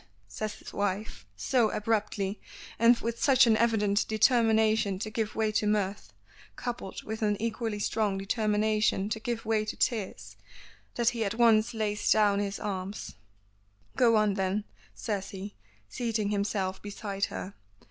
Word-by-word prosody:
says 210 - -5
his - - -12
wife, 200 - -3
so 225 - +2
abruptly, 210 -2 -1 0.4
and 230 +1 +6
with 230 +1 -3
such 265 -2 +6
an 225 -2 +4
evident 220 -3 +2
determination 220 -2 +3
to 215 +3 -5
give 220 -1 -2
way 220 -1 +1
to 210 0 0
mirth, 200 - -1 0.4
coupled 240 -6 -5
with 220 +1 -5
an 210 -2 +1
equally 225 -1 -2
strong 205 -1 0
determination 210 0 +1
to 220 0 -2
give 230 +1 -4
way 215 -1 +1
to 215 - -5
tears, 220 -6 -2 0.6
that 235 -1 +3
he 235 -2 -2
at 200 +1 -2
once 225 -1 +4
lays 210 -1 -1
down 205 -2 +4
his 200 -1 -2
arms. 195 0 -5 0.8
"Go 235 -3 +4
on 215 -2 +3
then," 195 +1 -1 0.3
says 195 - -3
he, 200 +1 -7 0.3
seating 220 - -2
himself 200 -2 -1
beside 200 -1 -3
her. 195 - -6
215 Hz, 145 wpm, -29 LUFS, 200-225 Hz, 0.8 s, and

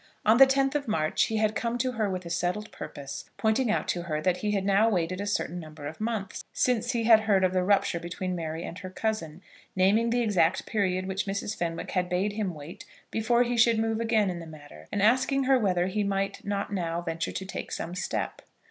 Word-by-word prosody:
On 220 +2 +6
the 270 +1 +9
10th 270 0 +2
of 290 -2 -2
March 155 -8 +1
he 220 - -2
had 215 0 +2
come 235 +1 -1
to 255 +1 0
her 220 -4 -1
with 185 -1 -4
a - - -6
settled 180 +5 -1
purpose, 140 -1 -8
pointing 220 +3 +1
out 215 - 0
to 175 - 0
her 155 -3 -2
that 180 +3 +1
he 210 - -2
had 200 -2 0
now 200 +3 +4
waited 185 -1 -1
a 205 - -3
certain 180 -3 -1
number 155 -3 -10
of 155 +7 -7
months 215 -4 -3
since 245 0 +1
he 235 -1 0
had 225 -1 +7
heard 205 -3 +2
of 185 0 +2
the 185 - +2
rupture 195 -2 +2
between 180 +2 -4
Mary 165 -1 -4
and 175 - -7
her 185 -1 -7
cousin, 185 -4 -3 0.3
naming 205 +5 +3
the 240 +1 +1
exact 185 -5 +2
period 185 -3 0
which 190 +1 -2
Mrs. 200 +2 -2
Fenwick 170 -3 -3
had 180 -1 0
bade 190 +4 0
him 205 -5 -2
wait 160 +7 -9 0.3
before 235 +2 +2
he 245 0 -1
should 230 -1 +4
move 225 0 0
again 220 -4 +2
in 175 - -5
the 165 - -9
matter, 145 - -13
and 200 - 0
asking 260 +5 +3
her 265 0 +4
whether 180 -5 +1
he 205 +3 -1
might 195 0 -2
not 200 0 -2
now 170 -3 -1
venture 165 -1 -3
to 190 - -5
take 190 - -6
some 170 - -4
step. 185 - -3
195 Hz, 230 wpm, -28 LUFS, 175-220 Hz, 0.3 s, the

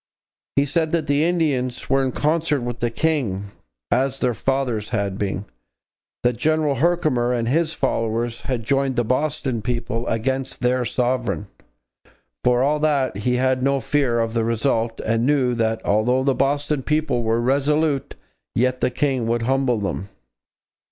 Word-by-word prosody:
He 140 - +3
said 160 +3 0
that 165 -3 +1
'the 145 +1 +2
Indians 150 -8 0
were 135 0 +2
in 130 - 0
concert 155 0 +1
with 120 -1 -4
the 120 - 0
King, 115 -8 -1 0.4
as 135 +1 +1
their 125 -2 +1
fathers 125 -4 -1
had 100 -4 -2
been;... 100 -1 -2 0.8
that 120 -1 +2
General 155 +1 +1
Herkimer 150 -6 +2
and 115 -2 -1
his 160 +5 +1
followers 115 +1 -1
had 125 -3 -1
joined 135 +1 +1
the 120 - +2
Boston 130 -2 -1
people 115 0 -2
against 130 +3 -2
their 125 0 +1
Sovereign.' 125 -5 -1 0.9
For 125 0 +3
all 150 +2 +2
that, 140 -7 +1
he 125 +5 0
had 130 0 +1
no 140 +1 +2
fear 135 -3 +1
of 115 0 -1
the 115 -1 +1
result 115 0 0
and 115 +1 0
knew 135 -4 +2
'that 115 -1 -1
although 125 +5 +2
the 135 0 +2
Boston 145 +1 0
people 150 -3 0
were 115 0 +1
resolute, 140 +3 +1 0.4
yet 125 +2 +1
the - - +3
King 130 -2 0
would 115 0 0
humble 130 -1 +1
them.' 100 -1 -3
130 Hz, 160 wpm, -22 LUFS, 115-140 Hz, 0.9 s, He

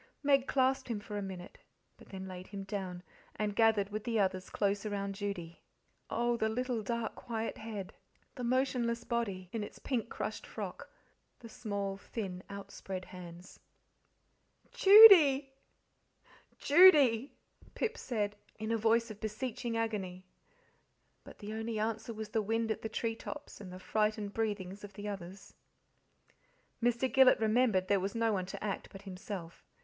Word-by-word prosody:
Meg 275 -2 +3
clasped 265 0 +1
him 230 -4 -2
for 210 0 -8
a 205 - -2
minute, 185 -2 -8 0.4
but - - -18
then 190 -1 -7
laid 185 0 -8
him 200 -1 -6
down, 190 -3 -5 0.3
and 210 -1 -2
gathered 220 -3 +3
with 215 0 -4
the 230 -2 0
others 185 -2 0
close 200 -1 0
around 200 -2 -3
Judy. 195 -5 -5 0.5
Oh, 240 0 0
the 220 -1 +1
little 245 0 -1
dark, 230 +2 -3
quiet 225 -1 -4
head, 215 -4 -6 0.4
the 250 - -7
motionless 240 -2 0
body, 200 -6 -2
in 225 -2 -3
its - - -9
pink, 240 -4 -2
crushed - - -5
frock, - - -7 0.5
the 235 - -11
small, 200 -3 -4
thin, 195 -3 -6
outspread 195 -1 -7
hands! 175 0 -11 1.1
"Judy!" 390 -9 +9 2.4
Pip 465 0 -1
said, 210 - -2 0.2
in 220 +1 -3
a 230 - +2
voice 230 +1 +2
of 210 - -11
beseeching 230 +2 -3
agony. 190 -5 -3 1.0
But - - -13
the 210 0 -7
only 225 0 -3
answer 220 +1 -2
was 220 -1 -6
the 220 0 0
wind 225 +2 0
at - - -3
the 220 - -4
tree 225 +1 -2
tops 290 0 -8
and 185 -3 -9
the 185 - -8
frightened 210 +1 -1
breathings 205 -3 -3
of 205 -1 -9
the 205 +2 -7
others. 195 -1 -8 1.3
Mr. 240 +2 +2
Gillet 265 0 +6
remembered 220 -4 +2
there 200 0 +3
was 195 +3 -3
no 230 -1 +2
one 185 -2 -2
to 190 - -7
act 205 -2 -3
but 195 0 -11
himself. 185 -3 -7
215 Hz, 155 wpm, -33 LUFS, 195-230 Hz, 2.4 s, Judy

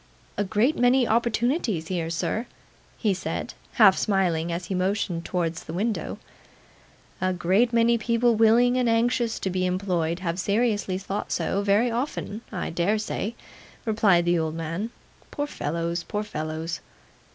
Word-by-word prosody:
'A 205 - 0
great 220 +9 +2
many 245 0 +4
opportunities 235 - 0
here, 170 -3 -2
sir,' 215 +7 -2 0.5
he 210 -4 +1
said, 185 - -4 0.2
half 205 -5 +7
smiling 175 -5 +1
as 170 +1 -3
he 190 - -4
motioned 185 -2 -1
towards 170 -3 -2
the 160 - -8
window. 215 +4 -2 1.0
'A 185 0 +1
great 190 +7 +2
many 235 0 +3
people 235 +1 +2
willing 230 +3 +4
and 250 -2 +2
anxious 230 0 +1
to 190 - -2
be 185 0 0
employed 180 -3 0
have 175 -1 -3
seriously 205 -1 +1
thought 195 +2 -4
so 200 - 0
very 205 +4 +3
often, 230 -3 -3
I 185 -5 -3
dare 175 +6 +1
say,' 215 +1 -3 0.5
replied 210 -6 +3
the 175 0 +3
old 160 -1 -2
man. 165 +7 -3 0.4
'Poor 290 - -2
fellows, 170 - -2
poor 210 +4 -3
fellows! 160 -3 -4
200 Hz, 150 wpm, -25 LUFS, 175-230 Hz, 1.0 s, half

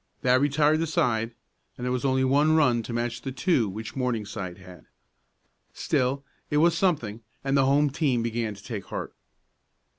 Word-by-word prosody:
That 125 +1 +4
retired 145 +2 +3
the 165 - 0
side, 115 -6 0 0.4
and 125 - -5
there 125 - 0
was 125 +1 -1
only 130 -1 +2
one 145 +4 +3
run 130 -7 +3
to 115 - -7
match 120 0 -2
the 135 - -5
two 130 - +1
which 110 +3 -7
Morningside 110 -8 -3
had. 90 -2 -14 0.9
Still 130 +2 0 0.3
it 150 - +1
was 165 +2 +4
something, 135 - 0 0.2
and 135 0 0
the 135 -1 +4
home 140 +1 +3
team 135 -5 +1
began 115 -2 -2
to - - -15
take 105 -5 -6
heart. - - -6
125 Hz, 175 wpm, -26 LUFS, 115-145 Hz, 0.9 s, That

